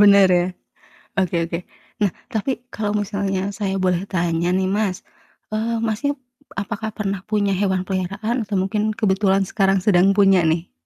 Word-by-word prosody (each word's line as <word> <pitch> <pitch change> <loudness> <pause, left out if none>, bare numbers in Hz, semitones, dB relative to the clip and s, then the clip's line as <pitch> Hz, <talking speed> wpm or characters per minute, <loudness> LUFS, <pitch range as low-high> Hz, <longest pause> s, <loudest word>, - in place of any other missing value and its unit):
Bener 200 -1 +8
ya. 175 - +2 0.7
Oke 185 -2 +1
oke. 170 0 -3 0.4
Nah, 205 -2 +3 0.2
tapi 220 +4 -1 0.2
kalo 210 -1 -2
misalnya 200 -2 -2 0.2
saya 195 -3 -1
boleh 180 -1 +2
tanya 170 -2 0
nih 190 0 +1
Mas, 200 -4 0 0.6
eee, 225 +2 0
Masnya 225 +6 0 0.4
apakah 220 +2 -3
pernah 195 -3 -1
punya 205 -2 +2
hewan 190 -2 +1
peliharaan 200 +6 -2
atau 200 -1 -2
mungkin 210 +2 -1 0.2
kebetulan 195 -1 +2
sekarang 195 -1 +2
sedang 185 -3 +5
punya 195 -2 +6
nih? 165 +2 0
195 Hz, 150 wpm, -21 LUFS, 185-210 Hz, 0.7 s, Bener